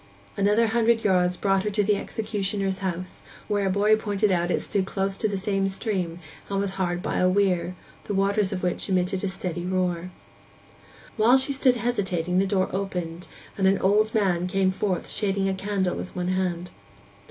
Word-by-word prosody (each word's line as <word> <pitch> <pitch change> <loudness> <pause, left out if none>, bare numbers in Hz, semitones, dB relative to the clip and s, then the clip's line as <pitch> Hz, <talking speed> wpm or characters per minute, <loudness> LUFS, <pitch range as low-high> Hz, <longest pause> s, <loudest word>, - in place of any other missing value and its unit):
Another 210 +3 +3
hundred 230 0 +2
yards 180 -3 +2
brought 195 -1 +2
her 210 - 0
to 210 0 +1
the 205 +1 +2
executioner's 200 -2 -2
house, 185 -1 -4 0.3
which 205 -1 0
a - - +2
boy 205 +3 +4
pointed 210 -1 0
out 175 -1 +1
It - - +1
stood 190 -2 -1
close 195 0 -1
to 215 - 0
the 200 -2 -2
same 195 0 0
stream, 190 -4 -2 0.3
and 195 -1 -1
was 200 -1 -1
hard 180 -2 -2
by - - -1
a 185 - +4
weir, 185 -2 +1 0.3
the 205 - -3
waters 195 0 +1
of 185 -2 -4
which 180 +2 -1
emitted 185 +1 0
a - - +1
steady 185 -3 -4
roar. 180 -1 -1 1.1
While 230 +4 +6
she 265 +1 -1
stood 260 -2 +3
hesitating 185 -7 0
the 195 - +2
door 190 -1 +1
opened, 180 -3 -4 0.3
and 190 -1 +2
an 195 +1 +4
old 210 +3 +3
man 180 -4 +1
came 190 0 +2
forth 190 -2 -2
shading 195 -2 0
a 195 - +1
candle 190 -1 -1
with - - -7
one 180 0 -2
hand. 180 -1 -1
195 Hz, 185 wpm, -25 LUFS, 185-205 Hz, 1.1 s, While